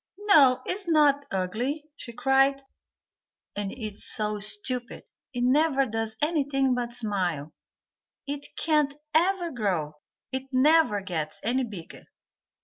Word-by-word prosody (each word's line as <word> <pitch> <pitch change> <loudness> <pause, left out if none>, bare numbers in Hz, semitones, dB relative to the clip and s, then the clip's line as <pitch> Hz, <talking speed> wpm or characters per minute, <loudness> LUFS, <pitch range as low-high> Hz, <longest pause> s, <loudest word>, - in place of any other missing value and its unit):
"No, 275 -11 +5
it - - -1
is 390 0 -3
not 290 -3 +3
ugly," 235 +11 -2
she 235 - -9
cried. 270 +3 +2 0.9
"And 200 -1 -3
it's 215 -4 -4
so 210 -2 0
stupid, 215 +4 -2 0.3
it 245 -3 -2
never 275 +1 +3
does 225 -1 -3
anything 280 -4 +1
but 240 -1 -3
smile, 180 -10 -2 0.7
it 285 0 -5
can't 300 -3 +1 0.2
even 350 0 +2
grow, 175 -10 -2 0.3
it 265 +1 -5
never 275 -5 +4
gets 160 -5 -4
any 255 +4 +1
bigger." 195 -8 -10
255 Hz, 125 wpm, -26 LUFS, 210-285 Hz, 0.9 s, No